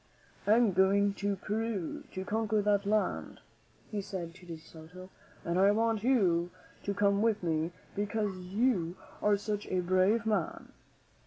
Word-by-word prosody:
"I 210 - +6
am 235 -3 +4
going 200 +2 +3
to 200 0 0
Peru 210 -3 -3
to 190 0 -4
conquer 220 0 0
that 205 -1 +2
country," 210 +1 0 0.5
he 210 -2 -2
said 185 -4 -6
to 180 0 -16
De 165 -1 -6
Soto, 160 +4 -13 0.3
"and 170 +2 0
I 195 +1 +6
want 220 0 +1
you 185 -9 +3 0.4
to 200 - -1
come 200 0 +3
with 220 -3 +1
me 160 0 0 0.2
because 205 -1 -1
you 185 -2 0 0.3
are 205 -1 +3
such 205 0 -3
a 185 - 0
brave 185 +6 +2
man." 210 -7 -1
200 Hz, 155 wpm, -31 LUFS, 180-215 Hz, 0.5 s, I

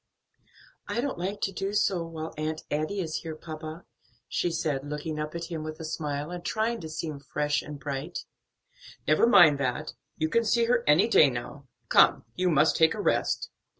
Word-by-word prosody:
"I - - -2
don't 265 -6 -2
like 195 +3 -3
to 195 - 0
do 195 +2 -3
so 195 -4 +2
while 160 -1 -6
Aunt 155 +1 -3
Adie 155 +7 -1
is 160 -3 -3
here, 160 -2 -6
papa," 155 +1 -8 0.4
she 175 - 0
said, 145 -4 -2
looking 150 +1 -4
up 150 +1 -4
at 170 - -4
him 160 -2 -3
with 155 +1 -6
a 160 - -6
smile, 150 -1 -3
and 175 -1 -6
trying 225 +3 -1
to 160 - -7
seem 155 -2 -4
fresh 150 +2 -1
and 150 -1 -8
bright. 135 -1 -5 0.8
"Never 155 +9 +4
mind 155 - +7
that; 140 +3 -2 0.2
you 155 - +1
can 230 +8 +2
see 230 +1 +2
her 235 0 +2
any 150 +9 +5
day 155 -10 +6
now. 130 +3 -7 0.2
Come, - - +5
you 185 0 +1
must 155 -1 +4
take 160 +3 +4
a - - -6
rest." - - 0
160 Hz, 190 wpm, -28 LUFS, 150-180 Hz, 0.8 s, mind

